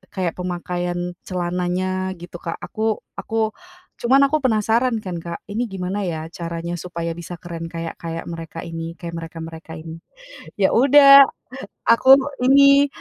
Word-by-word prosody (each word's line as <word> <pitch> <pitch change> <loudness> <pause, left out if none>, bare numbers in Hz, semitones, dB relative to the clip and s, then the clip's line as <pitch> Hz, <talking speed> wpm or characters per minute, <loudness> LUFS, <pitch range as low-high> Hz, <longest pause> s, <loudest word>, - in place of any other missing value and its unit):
kayak 180 -3 -1
pemakaian 175 0 -3
celananya 185 +1 -2
gitu 175 0 -10
Kak, 165 - -4
aku 220 0 -2 0.2
aku 220 -1 -1 0.5
cuman 265 +3 +4
aku 310 - +3
penasaran 230 0 +1
kan 180 -3 -5
Kak, 170 0 -7
ini 235 +3 -1
gimana 190 0 -4
ya 160 0 -5
caranya 170 0 -5
supaya 170 -1 -4
bisa 175 +1 -7
keren 170 -1 -7
kayak 165 0 -6
kayak 165 0 -5
mereka 165 0 -7
ini, 165 0 -6
kayak 170 -1 -7
mereka-mereka 165 0 -9
ini. 160 +1 -9 0.6
Ya 190 -1 +2
udah, 275 +2 +8 0.6
aku 230 +3 +4 0.4
ini, 280 +1 +6
180 Hz, 140 wpm, -21 LUFS, 165-220 Hz, 0.6 s, udah